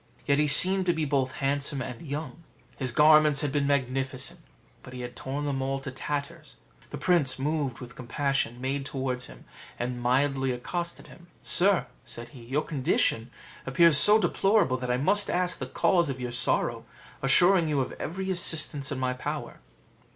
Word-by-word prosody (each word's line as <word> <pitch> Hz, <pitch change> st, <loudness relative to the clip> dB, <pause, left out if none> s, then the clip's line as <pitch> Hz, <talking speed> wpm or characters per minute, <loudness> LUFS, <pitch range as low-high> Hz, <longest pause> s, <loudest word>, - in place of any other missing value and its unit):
Yet 140 Hz, 0 st, +2 dB
he 150 Hz, -, +2 dB
seemed 185 Hz, +6 st, +6 dB
to 175 Hz, -, +3 dB
be 160 Hz, -2 st, -2 dB
both 135 Hz, -3 st, -1 dB
handsome 140 Hz, 0 st, -2 dB
and 125 Hz, -2 st, -6 dB
young: 150 Hz, +1 st, -7 dB, 0.3 s
his 130 Hz, -3 st, -3 dB
garments 150 Hz, 0 st, +5 dB
had 145 Hz, -, -2 dB
been 140 Hz, 0 st, 0 dB
magnificent, 135 Hz, +3 st, -2 dB, 0.4 s
but 125 Hz, -, -13 dB
he 125 Hz, -, -7 dB
had 120 Hz, 0 st, -8 dB
torn 140 Hz, +4 st, -5 dB
them 135 Hz, -2 st, -2 dB
all 135 Hz, +1 st, -2 dB
to 135 Hz, 0 st, -7 dB
tatters. 150 Hz, +4 st, -6 dB, 0.3 s
The -, -, -7 dB
prince, 170 Hz, -7 st, +1 dB
moved 140 Hz, -2 st, -2 dB
with 125 Hz, -1 st, -11 dB
compassion, 130 Hz, -1 st, -2 dB
made 135 Hz, +2 st, -3 dB
towards 130 Hz, -2 st, -4 dB
him, -, -, -15 dB, 0.3 s
and 120 Hz, 0 st, -4 dB
mildly 135 Hz, +1 st, +1 dB
accosted 170 Hz, +8 st, -5 dB
him: 175 Hz, -, -16 dB, 0.2 s
"Sir," 190 Hz, +1 st, +2 dB, 0.2 s
said 120 Hz, -1 st, -8 dB
he, 130 Hz, -5 st, -14 dB
"your 135 Hz, +6 st, -2 dB
condition 130 Hz, -5 st, 0 dB, 0.4 s
appears 165 Hz, +4 st, +4 dB
so 210 Hz, +8 st, +9 dB
deplorable, 195 Hz, -11 st, +1 dB
that 125 Hz, 0 st, -6 dB
I 125 Hz, -, +1 dB
must 200 Hz, +9 st, +1 dB
ask 180 Hz, 0 st, 0 dB
the -, -, -5 dB
cause 175 Hz, -5 st, +1 dB
of 130 Hz, -1 st, -5 dB
your 125 Hz, -1 st, -5 dB
sorrow, 125 Hz, +1 st, +1 dB, 0.4 s
assuring 175 Hz, +5 st, +5 dB
you 150 Hz, -2 st, 0 dB
of 130 Hz, -, -4 dB
every 190 Hz, +3 st, -4 dB
assistance 155 Hz, -5 st, 0 dB
in -, -, -3 dB
my 130 Hz, -1 st, -1 dB
power." 125 Hz, -, -6 dB
140 Hz, 175 wpm, -27 LUFS, 130-160 Hz, 0.4 s, so